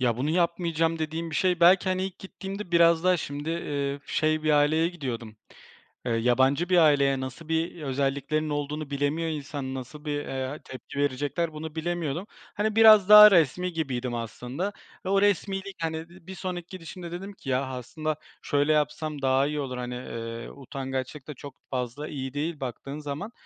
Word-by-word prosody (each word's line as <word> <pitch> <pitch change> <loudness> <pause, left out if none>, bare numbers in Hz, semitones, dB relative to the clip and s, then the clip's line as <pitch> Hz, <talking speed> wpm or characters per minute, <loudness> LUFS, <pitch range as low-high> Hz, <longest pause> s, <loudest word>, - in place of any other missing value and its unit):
Ya, 120 -3 +2
"Bunu 135 +5 -1
yapmayacağım." 165 -1 +1
dediğim 160 +1 -3
bir 155 - -6
şey 180 +3 +2
belki, 180 +2 +6
hani, 185 0 0
ilk 190 -2 -6
gittiğimde 195 0 -7
biraz 170 0 +5
daha 185 0 +5
şimdi, 145 0 -4
ııı, 140 -4 -2
şey 155 0 +1
bir 155 - +2
aileye 150 +3 +4
gidiyordum, 120 -10 -6 0.7
eee, 120 - -1
yabancı 130 +8 +2
bir 180 - +4
aileye, 140 -4 +4
nasıl 130 +5 -7
bir 165 +1 -1
özelliklerinin 140 +2 -1
olduğunu 145 0 -3
bilemiyor 145 +4 0
insan, 140 -3 -4
nasıl 135 +4 -8
bir, 145 -1 -2
eee, 135 +2 -4
tepki 130 +2 -8
verecekler 145 +4 -1
bunu 155 0 -7
bilemiyordum. 170 +1 -2 0.3
Hani, 215 0 0
biraz 215 -3 +8
daha 210 0 +11
resmî 180 +1 +3
gibiydim 130 -6 -2
aslında. 125 - -4 0.3
Ve 185 - -2
o 195 0 +3
resmîlik, 195 -1 0
hani, 160 -1 -1
ııı, 170 +2 -11
bir 190 - -7
sonraki 180 -2 -5
gidişimde 175 -1 -8
dedim 195 +4 -6
ki 140 - -9
"Ya, 130 +1 +1
aslında 130 +5 -4 0.3
şöyle 145 +2 +2
yapsam 150 0 -1
daha 135 +1 +3
iyi 150 0 -2
olur." 130 -3 -4
hani, 125 0 -4
ııı, 115 -2 -6
utangaçlık 135 0 -5
da 150 - -5
çok 140 0 -10 0.2
fazla 125 +4 -3
iyi 135 -3 -5
değil 150 +2 -3
baktığın 135 +3 -5
zaman. 150 +9 -5
150 Hz, 175 wpm, -27 LUFS, 135-170 Hz, 0.7 s, daha